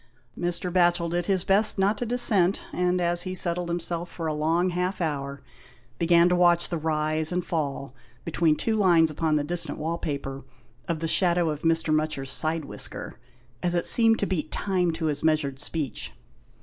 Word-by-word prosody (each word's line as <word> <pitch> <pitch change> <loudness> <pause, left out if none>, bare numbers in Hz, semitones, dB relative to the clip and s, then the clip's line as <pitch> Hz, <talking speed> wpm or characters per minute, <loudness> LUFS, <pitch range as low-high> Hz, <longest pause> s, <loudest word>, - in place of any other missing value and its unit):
Mr. 175 0 -2
Batchel 175 -2 +2
did 175 0 -2
his 190 -3 +1
best 205 +3 +3
not 195 +2 +2
to 245 - -3
dissent, 210 -6 +2
and 180 0 0
as 175 0 +2
he 185 0 -1
settled 175 -1 0
himself 170 0 -2
for 165 - -7
a 155 - -1
long 165 +4 0
half 180 +2 -2
hour, 140 -4 -3 0.6
began 170 0 +4
to 180 - +2
watch 175 -1 +3
the 170 - -2
rise 155 0 0
and 180 0 -2
fall, 140 -5 -3 0.3
between 165 -1 +1
two 220 +7 -1
lines 170 -6 +4
upon 155 0 0
the 150 - +1
distant 175 +3 -1
wall 165 +2 -3
paper 140 -2 -5 0.4
of 165 -2 -2
the 165 - -1
shadow 175 -1 +2
of 150 0 -6
Mr. 165 -1 +1
Mutcher's 155 -3 -1
side 160 -1 0
whisker, - - -4 0.4
as 175 0 -1
it 175 - 0
seemed 225 -1 +5
to - - -1
beat 165 -6 -3
time 185 -3 0
to 160 0 -4
his 150 -2 -2
measured 155 -4 0
speech. 135 - -3
170 Hz, 185 wpm, -25 LUFS, 155-180 Hz, 0.6 s, seemed